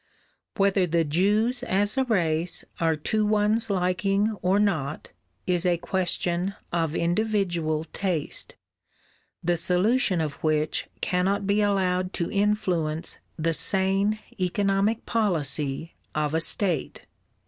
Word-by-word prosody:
Whether 195 -2 +3
the 165 0 +2
Jews 210 - +1
as 205 -3 +1
a 265 - +2
race 170 -6 0
are 165 -1 +2
to 215 +8 0
one's 215 +2 +2
liking 195 +3 +1
or 185 +2 +2
not, 160 -9 -1 0.4
is 180 -1 +1
a 175 -2 +2
question 175 +1 -1 0.2
of 165 -2 0
individual 175 -4 0
taste, 170 -1 -3 0.9
the 175 +1 +2
solution 185 +4 +2
of 155 -3 -4
which 155 -1 0
cannot 190 +2 0
be 205 +1 +2
allowed 185 -2 +1
to 170 - -2
influence 180 -6 0 0.2
the 165 0 0
sane 195 +5 +1 0.2
economic 195 +4 +1
policy 155 -8 -1 0.2
of 150 0 0
a 160 - +2
state. 180 +1 0
185 Hz, 115 wpm, -26 LUFS, 165-205 Hz, 0.9 s, Whether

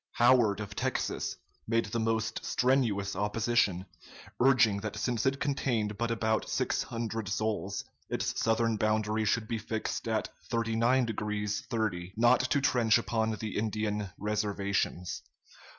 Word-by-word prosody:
Howard, 120 -4 +4
of 100 -1 -6
Texas, - - -2 0.3
made 115 0 +2
the 115 +3 -3
most 110 0 -1
strenuous 115 -7 +1
opposition, 105 -3 +1 0.6
urging 120 -5 +5
that 105 0 -5
since 120 0 0
it 135 +1 +1
contained 120 -7 0
but 115 +3 -1
about 110 -1 0
six - - 0
hundred 115 -3 -4
souls, 105 -2 -2 0.2
its - - -2
southern 115 0 +2
boundary 110 0 +1
should 110 +1 +1
be 115 0 -2
fixed 110 +2 -3
at 110 -1 0 0.2
39 115 +2 +2
degrees 105 -2 -2
30', 100 -7 -2
not 120 +2 +5
to 130 +2 +1
trench 120 -5 +3
upon 110 -1 0
the 105 0 -5
Indian 105 -1 -1
reservations. 100 -3 -1
110 Hz, 135 wpm, -30 LUFS, 105-115 Hz, 0.6 s, urging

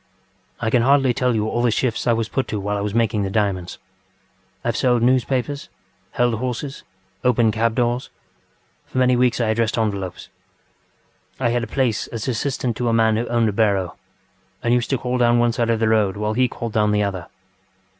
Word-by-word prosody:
ŌĆ£I 110 - 0
can 120 - +4
hardly 135 0 +4
tell 125 -2 +1
you 110 0 0
all 120 - -1
the 120 - +3
shifts 115 +1 -1
I 120 - +4
was 115 -1 -1
put 135 - -2
to 105 - -3
while 100 +1 -2
I 100 - -2
was 105 +1 -3
making 115 -2 +1
the 100 - -1
diamonds. 95 -4 -1 0.9
I - - +1
have - - -1
sold 125 -2 +2
newspapers, 130 +3 0 0.4
held 120 -1 +2
horses, 130 +3 -4 0.4
opened 120 -3 +3
cab 115 +1 0
doors. 120 +1 0 0.8
For - - -7
many 125 0 +4
weeks 125 0 +2
I 115 -2 +1
addressed 115 +1 0
envelopes. 100 -5 -3 1.1
I 125 -3 +1
had 120 0 0
a - - -4
place 125 -5 0
as 115 0 -6
assistant 125 -1 -2
to 120 -1 0
a - - +1
man 110 -1 +3
who 115 +2 -1
owned 115 -2 +2
a - - -3
barrow, 100 -4 +1 0.7
and 120 - +2
used 120 -2 +1
to 135 - +1
call 125 +1 -2
down 120 0 +4
one 120 0 +3
side 115 0 -1
of 115 -1 +1
the 110 - +2
road 105 -3 +2
while 105 +1 -1
he 125 +3 +2
called 115 -2 -6
down 105 -1 +2
the 105 0 +2
other. 95 -4 -3
115 Hz, 205 wpm, -21 LUFS, 110-125 Hz, 1.1 s, can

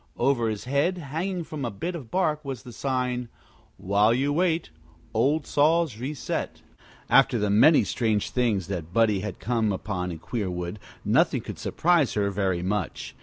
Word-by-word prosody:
Over 120 -3 +2
his 105 -2 -4
head, 140 +8 +1
hanging 170 +4 -3
from 155 -3 -6
a 120 - -1
bit 165 - -4
of 145 -10 -8
bark, 155 -3 0
was 135 -4 -6
the 125 -3 -10
sign: 125 -2 -2 0.5
WHILE 105 +4 +3
YOU 140 +3 +1
WAIT 170 - 0 0.4
OLD 140 +7 +2
SAWS 155 -4 +2
RESET 135 +3 -4 0.4
After 135 -2 +5
the 105 -2 0
many 145 +10 +6
strange 110 -4 0
things 115 -7 +1
that 85 -3 -5
Buddie 110 -3 +3
had 105 +2 -5
come 115 -3 0
upon 90 -2 -3
in 85 - -6
Queerwood, 90 -1 -4 0.3
nothing - - +3
could - - -8
surprise 170 -6 +2
her 100 -1 +1
very 95 -3 -1
much. 95 -1 -3
120 Hz, 165 wpm, -26 LUFS, 105-145 Hz, 0.5 s, many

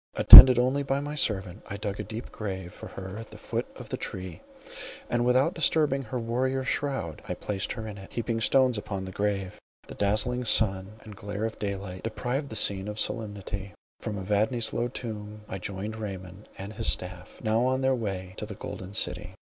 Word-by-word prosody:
Attended 130 -2 +12
only 130 +3 +2
by 135 0 -1
my 145 +1 -5
servant, 100 -8 -1
I 100 - -5
dug 100 -1 -4
a - - -2
deep 115 +2 -8
grave 95 -5 -6
for - - -10
her 95 +1 -8
at 115 0 -9
the - - -11
foot - - -4
of - - -11
the - - -3
tree, 90 -4 -7 0.7
and 120 0 +1
without 130 +7 +3
disturbing 150 -4 +2
her 120 +3 -4
warrior 130 +3 -1
shroud, 130 - -2
I - - -2
placed 100 -2 -4
her 115 -3 -7
in 105 -2 -8
it, 95 - -12
heaping 115 -1 -2
stones 130 0 +3
upon 100 -2 -5
the 95 - -7
grave. 100 -1 -2 0.3
The - - -9
dazzling 110 +5 0
sun 100 -2 +1
and 105 -2 -11
glare 100 +2 -4
of 115 - -5
daylight, 100 -2 -5
deprived 125 +5 -3
the 110 - -7
scene 100 -2 +1
of 105 0 -4
solemnity; 100 -4 -4 0.2
from 105 - -5
Evadne's 105 +4 0
low 120 - 0
tomb, 105 -4 -7
I 95 - -6
joined 100 +3 -5
Raymond 95 -2 -8
and 100 +2 -7
his 110 +1 +1
staff, 90 -1 -6
now 110 +1 +1
on 130 +1 0
their 130 0 +2
way 95 -6 -4
to 105 - -5
the 105 - -7
Golden 95 -1 -8
City. - - -1
105 Hz, 195 wpm, -27 LUFS, 95-120 Hz, 0.7 s, Attended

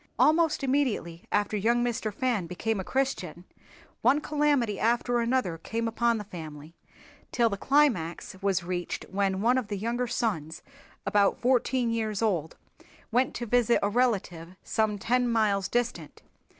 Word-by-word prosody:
Almost 315 -1 +3
immediately 255 - -1
after 205 +1 +1
young 235 +4 +2
Mr. 225 -2 -2
Fan 215 -4 -1
became 205 +5 -2
a - - -3
Christian 185 - -2 0.6
one 290 - +4
calamity 290 -8 +1
after 240 +1 +1
another 235 -8 0
came 230 +6 -3
upon 235 +1 +1
the 210 - -5
family 155 -5 -9 0.6
till 235 -2 +2
the - - -1
climax 210 - +1
was 195 -3 +1
reached 175 0 -4
when 195 -1 0
one 250 +3 +4
of 240 - -6
the 205 -1 -3
younger 235 +4 -2
sons, 190 -10 -2 0.4
about 205 -1 +3
fourteen 250 -1 +1
years 220 -2 -1
old, 175 -8 -1 0.5
went 250 +3 +1
to 240 - -3
visit 240 0 +3
a 205 - +2
relative 195 -7 -1
some 215 -1 0
ten 245 +4 +1
miles 210 -4 +1
distant. 235 -11 -3
225 Hz, 150 wpm, -28 LUFS, 190-245 Hz, 0.6 s, one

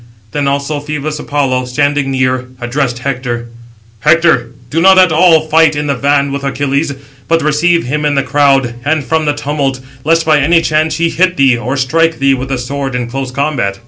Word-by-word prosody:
Then 145 +2 -1
also 140 +2 -1
Phœbus 150 +1 -4
Apollo, 135 -4 -1
standing 145 +2 0
near, 130 -1 -1
addressed 120 +1 -2
Hector: 125 -2 -4 0.5
"Hector, 155 -4 +3 0.2
do 165 - 0
not 190 +1 +6
at 185 -2 +5
all 160 -1 +4
fight 155 0 +3
in 145 0 -2
the 145 - 0
van 140 +1 +1
with 140 0 -4
Achilles, 140 +2 -1 0.4
but 165 -1 +1
receive 165 +3 +2
him 150 +4 -2
in 145 -1 +1
the 140 - +1
crowd, 135 -2 +2
and 150 +1 0
from 160 +2 -1
the 145 - +1
tumult, 140 -2 -2 0.2
lest 165 +2 +2
by 155 -2 +3
any 165 +4 +3
chance 155 0 0
he 165 0 0
hit 180 +2 +1
thee, 135 -3 +4
or 125 +4 -3
strike 165 +5 +1
thee 135 0 +2
with 130 0 -4
the 135 - -1
sword 135 +1 -4
in 120 -1 -3
close 135 0 -4
combat." 130 -7 -2
145 Hz, 195 wpm, -13 LUFS, 130-155 Hz, 0.5 s, not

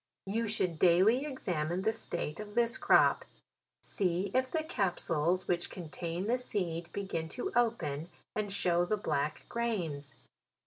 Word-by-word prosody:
You 225 +4 -1
should 180 -6 0
daily 200 - +5
examine 180 - -2
the 220 +1 +2
state 170 -7 -4
of 210 0 -8
this 235 0 +3
crop; - - +5 0.6
see 185 0 0
if 260 0 +2
the 315 +2 -1
capsules 180 - 0
which 175 -1 0
contain 170 +1 -4
the 245 +4 +1
seed, 175 -8 -3
begin 180 -5 -3
to 245 - -4
open, 175 -11 +1 0.3
and 210 -2 -1
show 175 -3 +2
the 210 +4 0
black 150 -6 -1
grains. 175 -12 -2
185 Hz, 140 wpm, -32 LUFS, 170-225 Hz, 0.6 s, daily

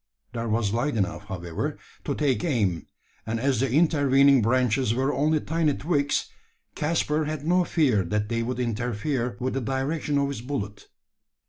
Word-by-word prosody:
There 115 -1 -3
was 110 -2 0
light 125 +4 0
enough, 100 +1 -2
however, 85 -4 -4 0.3
to - - -1
take 140 -2 +1
aim; 105 - 0 0.4
and 115 +1 -1
as 130 -1 +1
the 135 0 0
intervening 140 -3 +4
branches 125 0 +2
were 135 +3 +1
only 155 +2 +2
tiny 160 -2 0
twigs, 145 -3 0 0.5
Caspar 155 0 0
had 155 -1 -4
no 180 +2 +3
fear 135 - +2
that 105 +3 -1
they 115 +1 -1
would 125 +2 -3
interfere 120 +1 -2
with 130 +1 -2
the 135 - -1
direction 135 +4 -1
of 140 0 +1
his 140 -5 -5
ballet. 120 -6 -3
130 Hz, 160 wpm, -26 LUFS, 115-145 Hz, 0.5 s, intervening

